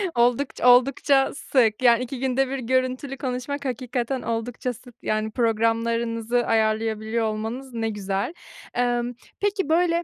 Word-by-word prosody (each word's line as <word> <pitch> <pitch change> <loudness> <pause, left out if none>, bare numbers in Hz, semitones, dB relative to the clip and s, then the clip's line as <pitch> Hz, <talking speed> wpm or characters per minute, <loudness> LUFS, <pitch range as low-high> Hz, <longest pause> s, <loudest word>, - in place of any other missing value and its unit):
Oldukç 245 +3 +1
oldukça 270 +2 +4
sık, 235 -6 +1
yani, 240 0 +5
2 255 +1 -6
günde 265 +1 +1
1 275 - -2
görüntülü 255 +2 -1
konuşmak 275 +2 -4
hakikaten 250 0 -2
oldukça 230 +2 -3
sık, 245 0 -15
yani, 215 0 -1
programlarınızı 230 +1 +1
ayarlayabiliyor 220 0 +1
olmanız 225 +4 -4
ne 225 -1 -1
güzel. 200 - -2 0.4
Emm, 245 0 0 0.3
peki, 400 -4 0
böyle 340 +1 +2
245 Hz, 125 wpm, -24 LUFS, 225-260 Hz, 0.4 s, yani